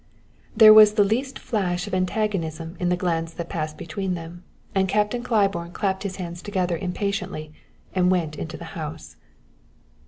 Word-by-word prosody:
There 215 -1 +10
was 215 -1 +8
the 205 - +5
least 255 +7 -1
flash 180 -4 -2
of 205 - -8
antagonism 180 -4 -1
in 180 - 0
the 180 - +1
glance 165 -2 -1
that 170 -1 -6
passed 155 -1 -4
between 185 +3 -3
them, 170 +1 -9 0.3
and 190 -1 +1
Captain 210 +4 +1
Claiborne 195 -7 0
clapped 190 0 -1
his 200 -2 -4
hands 175 -2 -6
together 185 -4 -1
impatiently 185 -4 -3 0.4
and 180 -1 +3
went 170 -5 0
into 80 - -6
the - - -9
house. - - -7
185 Hz, 160 wpm, -24 LUFS, 170-205 Hz, 0.4 s, There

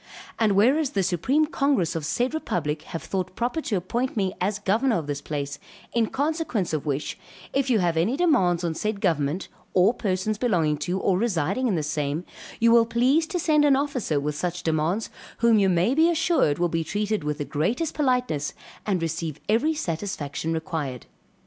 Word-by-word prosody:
And 220 -3 +3
whereas 260 +9 +3
the 195 -5 0
supreme 190 - +2
congress 275 - +1
of 155 -3 -2
said 245 - 0
republic 155 - -2
have 165 - -5
thought 185 -1 -3
proper 245 +7 -1
to 225 - -2
appoint 235 +8 -2
me 190 -2 0
as 200 +2 0
governor 220 +5 +1
of 160 - -3
this 145 -1 -4
place, 145 -1 -4 0.3
in 230 -2 +2
consequence 280 - -1
of 155 0 -2
which, 145 0 -2 0.3
if 275 -1 +1
you 240 - +4
have 175 -4 +1
any 210 +12 +1
demands 190 - +3
on 170 -2 0
said 210 +4 -2
government, 160 -2 0 0.3
or 185 +5 +5
persons 205 -1 -1
belonging 170 -11 +1
to 175 +6 -2
or 185 -1 +1
residing 205 - 0
in 205 - +1
the 155 - -1
same, 150 +2 -2 0.3
you 230 0 +5
will 230 -1 +6
please 260 +8 +2
to 370 - -2
send 310 -3 +3
an 285 -2 +5
officer 265 - 0
with 150 +1 -2
such 175 +3 -3
demands, 160 +6 0 0.3
whom 230 -2 +4
you 195 -1 +3
may 180 +7 +2
be 320 +4 +4
assured 325 - +2
will 175 - +2
be 165 -1 -1
treated 210 +2 -1
with 150 0 -2
the 145 - -3
greatest 215 - -1
politeness, 250 - 0 0.3
and 185 -5 0
receive 160 -2 -3
every 265 +10 +2
satisfaction 165 - -3
required. 160 -6 -3
195 Hz, 185 wpm, -25 LUFS, 160-250 Hz, 0.3 s, will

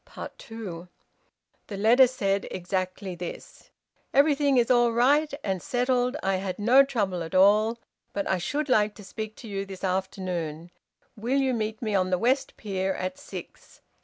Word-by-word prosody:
TWO. 190 -7 -8 0.8
The 200 - -6
letter 235 +6 +6
said 200 -6 -1
exactly 185 +1 -3
this: 175 0 -9 0.5
"Everything 285 -1 +4
is 240 0 +3
all 240 -1 +4
right 280 +6 +3
and 190 -3 -2
settled. 250 +1 0
I 195 0 +1
had 185 -1 -4
no 240 +6 +6
trouble 205 -10 -1
at 165 +1 -5
all. 210 +4 +5 0.3
But 200 - -2
I 190 - +1
should 290 - -2
like 215 -5 +2
to 210 - -12
speak 215 +2 -6
to 230 - -11
you 195 -2 -3
this 195 -1 -10
afternoon. 180 -4 -3 0.4
Will 240 +6 -1
you 265 -1 +1
meet 220 0 -3
me 215 -2 -1
on 185 -2 +2
the 180 - +2
West 255 +7 0
Pier 190 -2 -2
at 185 +10 -4
six? 285 - -10
210 Hz, 160 wpm, -26 LUFS, 185-245 Hz, 0.8 s, letter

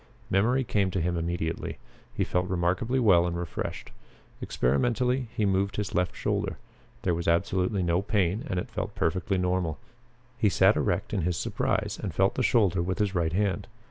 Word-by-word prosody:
Memory 120 +8 +3
came 100 -3 +1
to 95 - -2
him 90 +1 0
immediately. 85 -1 -2 0.3
He - - -1
felt 90 0 0
remarkably 95 +8 0
well 95 -8 +5
and 85 0 -2
refreshed. 85 -1 -5 0.5
Experimentally 125 - +1
he 105 - +2
moved 100 0 +1
his 105 -1 -3
left 90 0 0
shoulder. - - -1 0.5
There 90 - +2
was 85 0 -3
absolutely 90 +3 +1
no 85 +1 +2
pain 100 0 0
and 90 - 0
it - - -6
felt - - -4
perfectly 95 +4 0
normal. 90 -4 0 0.6
He 105 - +4
sat - - +4
erect - - -1
in 95 - +1
his 85 0 -1
surprise - - -1
and 95 -6 -4
felt 95 +1 +3
the - - -1
shoulder 100 -8 +3
with 90 +1 -2
his 105 -2 0
right 85 -3 0
hand. 100 +1 0
95 Hz, 175 wpm, -27 LUFS, 85-105 Hz, 0.6 s, well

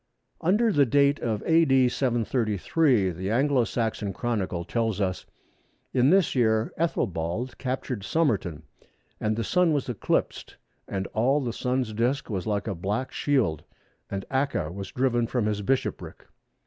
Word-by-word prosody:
Under 210 +7 +3
the 145 -7 +4
date 140 +2 +3
of 110 -3 -2
A.D. 135 -6 +4
733, 120 - +1
the 95 +3 -4
Anglo 130 +2 +2
Saxon 110 -4 -2
Chronicle 95 -7 -2
tells 110 -2 -1
us 95 -2 -1 0.7
that, 130 - +1
"In 125 +3 +5
this 190 -1 +4
year 110 -3 +2
Æthelbald 110 - -2
captured 130 -4 -3
Somerton; 100 - 0 0.6
and 110 0 0
the 115 - -2
Sun 180 - +2
was 140 -3 -1
eclipsed, 120 - -2 0.3
and 95 -1 -3
all 130 +6 +2
the 120 -5 -3
Sun's 125 -3 -1
disc 120 +5 -1
was 95 0 -3
like 105 +1 -1
a 100 - -1
black 100 +8 -3
shield; 110 - 0 0.5
and 100 -1 -4
Acca 130 - -1
was 95 0 -6
driven 120 -2 +1
from 120 -2 -1
his 105 -1 -1
bishopric." 130 +6 -2
120 Hz, 150 wpm, -26 LUFS, 100-135 Hz, 0.7 s, In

